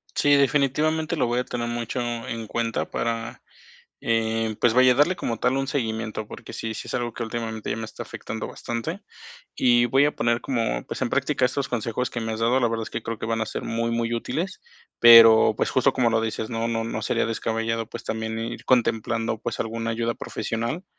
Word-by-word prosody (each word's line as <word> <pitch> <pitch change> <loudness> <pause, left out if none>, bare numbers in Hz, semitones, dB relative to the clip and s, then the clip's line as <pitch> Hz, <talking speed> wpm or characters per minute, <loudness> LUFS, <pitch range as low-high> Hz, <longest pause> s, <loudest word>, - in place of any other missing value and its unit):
Sí, 145 0 +4
definitivamente 150 +3 +2
lo 140 - +1
voy 120 +1 0
a - - 0
tener 120 -1 -3
mucho 120 +1 -3
en 115 -2 -4
cuenta 115 0 -2
para, 115 +1 -3 0.6
eh, 115 -1 0
pues, 115 -2 +3
vaya 130 0 +6
a - - +3
darle 150 +7 +3
como 115 -9 -3
tal 130 +2 +1
un 135 0 -1
seguimiento, 110 -5 -3
porque - - -10
sí, 110 -1 -4
sí - - -7
es - - -6
algo 120 -2 -2
que 120 - -4
últimamente 110 -1 -4
ya - - -2
me 110 - -4
está - - -8
afectando 110 -1 -6
bastante, 115 -1 -5 0.6
y 120 -1 +4
voy 135 +4 +4
a 150 - -1
poner 115 0 +1
como, 115 - -1
pues, - - -5
en - - 0
práctica 130 - +1
esos 135 +2 0
consejos 120 +1 -2
que 120 - -5
me 110 0 -3
has 110 - -4
dado, 120 +3 +3
la 120 - +3
verdad 115 0 -2
es - - -9
que 115 - -4
creo 115 0 -4
que - - -4
van 115 0 -1
a 110 - -1
ser - - -5
muy, 115 +1 -1
muy 115 0 -1
útiles, 165 +11 -3 0.4
pero, 115 -2 +9
pues, - - 0
justo 130 +1 +3
como 125 -2 +2
lo 115 -1 +2
dices, 110 0 -3
no 115 0 -1
no 115 -1 -1
no 110 -1 -4
sería - - 0
descabellado, 115 0 -2
pues, 115 - -9
también 110 0 -3
ir 115 +1 -5
contemplando, 115 -2 +1
pues, - - -4
alguna 115 0 -2
ayuda 115 +1 -1
profesional, 115 +11 -4
115 Hz, 215 wpm, -24 LUFS, 115-125 Hz, 0.6 s, pero